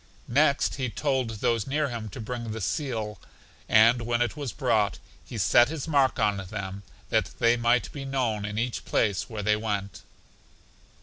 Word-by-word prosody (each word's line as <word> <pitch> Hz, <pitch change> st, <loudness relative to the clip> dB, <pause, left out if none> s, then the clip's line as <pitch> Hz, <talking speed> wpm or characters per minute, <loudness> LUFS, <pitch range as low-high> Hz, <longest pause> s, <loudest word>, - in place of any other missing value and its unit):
Next 140 Hz, 0 st, +3 dB
he 130 Hz, -2 st, -1 dB
told 130 Hz, -1 st, -1 dB
those 115 Hz, 0 st, 0 dB
near 145 Hz, +1 st, 0 dB
him 115 Hz, -3 st, -5 dB
to -, -, -9 dB
bring 115 Hz, +1 st, -5 dB
the 110 Hz, +1 st, -4 dB
seal, 110 Hz, -, -3 dB, 0.5 s
and 115 Hz, +3 st, +6 dB
when 120 Hz, 0 st, 0 dB
it 120 Hz, +3 st, 0 dB
was 145 Hz, -5 st, -4 dB
brought 110 Hz, -5 st, +1 dB, 0.3 s
he 120 Hz, -, -8 dB
set 120 Hz, +5 st, +5 dB
his 160 Hz, -1 st, -5 dB
mark 140 Hz, -4 st, +3 dB
on 105 Hz, -3 st, +2 dB
them 95 Hz, 0 st, -6 dB, 0.3 s
that -, -, +1 dB
they 115 Hz, 0 st, +4 dB
might 120 Hz, -5 st, +1 dB
be 140 Hz, -, -6 dB
known 125 Hz, -6 st, -1 dB
in 105 Hz, 0 st, -4 dB
each 120 Hz, +1 st, -2 dB
place 100 Hz, -6 st, 0 dB
where 110 Hz, -3 st, -5 dB
they 105 Hz, +1 st, +3 dB
went. 100 Hz, -3 st, -3 dB
115 Hz, 175 wpm, -27 LUFS, 105-130 Hz, 0.5 s, and